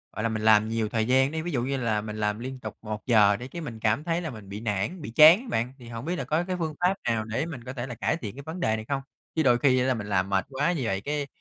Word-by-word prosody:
gọi 110 - -3
là, 115 - +1
mình 110 -1 -2
làm 110 0 +5
nhiều 115 -1 -1
thời 110 0 0
gian 130 +2 +4
đi, 160 0 -2
ví 175 +2 -4
dụ 125 -6 0
như 135 +2 -1
là 115 -4 0
mình 105 0 -6
làm 105 0 -1
liên 130 +2 -6
tục 110 -2 -7
1 105 -1 -6
giờ 105 -4 +5
đi 125 +4 -7
cái 170 +4 -7
mình 120 -7 -7
cảm 110 +5 +1
thấy 170 +1 -1
là 165 - -4
mình 110 -6 -10
bị 100 +2 -6
nản, 105 - -2
bị 145 - -6
chán 155 +5 +9
á - - -11
bạn. 120 +3 -1
Thì 120 - -12
hổng 115 +2 -6
biết 175 +2 -1
là - - -3
có 155 +3 0
cái 185 +1 -3
phương 160 -2 -2
pháp 180 +2 +4 0.2
nào 110 -1 0
để 115 +7 -2
mình 150 -8 -7
có 125 +2 -6
thể 125 0 -4
là 120 - -6
cải - - 0
thiện 115 -6 -7
cái 140 - -9
vấn 165 +3 -6
đề 110 -10 +1
này 110 0 -6
không? 140 -1 -1 0.3
Chứ 160 - +2
đôi 125 -3 +5
khi 130 -1 +4
á 125 - +1
là 130 - +2
mình 105 -4 -5
làm 95 -2 +1
mệt 95 -1 +1
quá 145 +5 0
như 165 -6 -2
vậy, 95 -3 -1
cái, 145 +3 -2
120 Hz, 335 wpm, -27 LUFS, 110-150 Hz, 0.3 s, chán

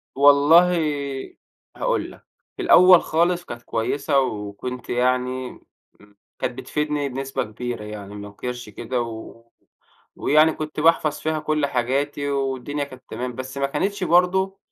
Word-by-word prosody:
والله 145 +6 +6 1.0
هاقول - - -1
لك، - - -17 0.3
في - - -4
الأول 185 - +7
خالص 175 +2 +1
كانت 120 0 -8
كويسة 140 +4 0
وكنت 125 +1 -4
يعني 125 +1 0 0.5
امم 105 0 -21 0.2
كانت 125 0 -3
بتفيدني 150 0 -2
بنسبة 135 +1 -3
كبيرة 115 +1 -6
يعني 105 -1 -8
ما 105 0 -7
أنكرش 120 +2 -6
كده، 120 +3 -3
و 115 0 -8 0.7
ويعني 155 +2 +4
كنت 155 0 -6
باحفظ 155 -1 +3
فيها 155 0 -1
كُلّ 150 -1 0
حاجاتي، 140 +3 -1
والدنيا 135 +1 -2
كانت 130 -2 -11
تمام، 125 -1 -5
بس 130 +1 -7
ما 140 - +1
كانتش 195 +8 -2
برضه 185 +2 +2
135 Hz, 135 wpm, -23 LUFS, 125-155 Hz, 1.0 s, الأول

